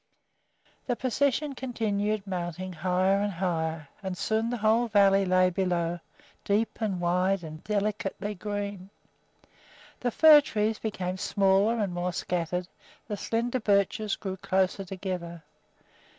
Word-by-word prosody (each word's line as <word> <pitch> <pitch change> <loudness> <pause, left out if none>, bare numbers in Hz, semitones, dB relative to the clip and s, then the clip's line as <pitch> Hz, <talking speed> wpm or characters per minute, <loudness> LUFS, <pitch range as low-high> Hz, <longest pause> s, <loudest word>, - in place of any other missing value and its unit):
The 245 - +1
procession 280 +3 0
continued 215 -5 -2
mounting 185 -1 -4
higher 185 +3 +1
and 205 0 -1
higher, 165 -3 -2
and 190 -2 -4
soon 220 +4 0
the 245 - -2
whole 225 +2 +3
valley 195 -2 +4
lay 185 0 +3
below, 175 -2 -1 0.4
deep 215 +3 0
and 200 -5 -1
wide 180 +2 +1
and 155 0 -9
delicately 210 0 -2
green. 200 -1 -5 1.1
The 245 - 0
fir 305 +4 +8
trees 220 -5 -1
became 185 -4 -3
smaller 195 +4 +2
and 200 -5 -1
more 175 0 -2
scattered, 175 +1 -2 0.4
the 210 - -3
slender 235 +5 -1
birches 205 0 +1
grew 190 -1 -5
closer 190 +1 0
together. 180 -3 -5
195 Hz, 125 wpm, -28 LUFS, 180-215 Hz, 1.1 s, fir